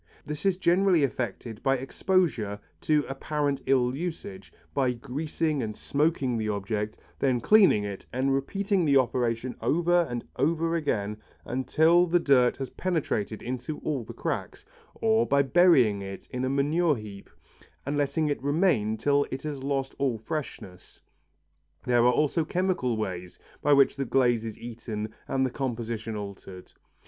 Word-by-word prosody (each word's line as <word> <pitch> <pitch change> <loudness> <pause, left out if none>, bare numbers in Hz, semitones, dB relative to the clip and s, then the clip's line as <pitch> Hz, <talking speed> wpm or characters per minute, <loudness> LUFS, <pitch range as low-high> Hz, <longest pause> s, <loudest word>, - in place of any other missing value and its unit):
This 150 +4 -3
is 190 -2 +2
generally 180 -2 +3
effected 120 -3 -3
by 135 -1 +2
exposure 135 - 0 0.2
to 150 -1 +2
apparent 145 +1 -2
ill 130 -1 +2
usage, 180 +5 -6 0.2
by 130 -3 +1
greasing 150 +4 -2
and 110 -2 -4
smoking 140 -5 0
the 110 -1 -2
object, 105 +1 -3 0.2
then 130 -3 +2
cleaning 195 - +5
it 100 -1 -6
and 135 +2 0
repeating 195 +7 0
the 140 -3 +4
operation 120 -1 0
over 175 +1 +2
and 120 -1 -4
over 165 +4 +1
again 105 -10 -1 0.5
till 170 +3 +4
the 175 +1 +3
dirt 130 -6 +3
has 135 -2 -5
penetrated 140 - -2
into 130 +4 -4
all 140 -6 -2
the - - -9
cracks, - - -4 0.3
or 225 +1 +2
by 140 0 +3
burying 135 - +4
it 95 0 -8
in 125 0 -3
a - - 0
manure 150 +4 +2
heap 105 -3 -10 0.6
and 140 +2 -2
letting 145 +2 0
it 145 - -2
remain 140 - +1
till 145 +2 +2
it 130 - -5
has 145 -3 -4
lost 135 -1 -2
all 130 -5 +1
freshness. 110 - -7 0.9
There 120 -1 +3
are 125 - +5
also 150 +4 +1
chemical 175 -9 0
ways 90 -4 -5 0.2
by 145 - +4
which 140 0 +4
the 135 - -1
glaze 120 -3 +2
is 110 - -6
eaten 110 -2 -6
and 135 0 +1
its 130 - -4
composition 115 -4 -3
altered. 100 -2 -9
135 Hz, 155 wpm, -27 LUFS, 115-155 Hz, 0.9 s, cleaning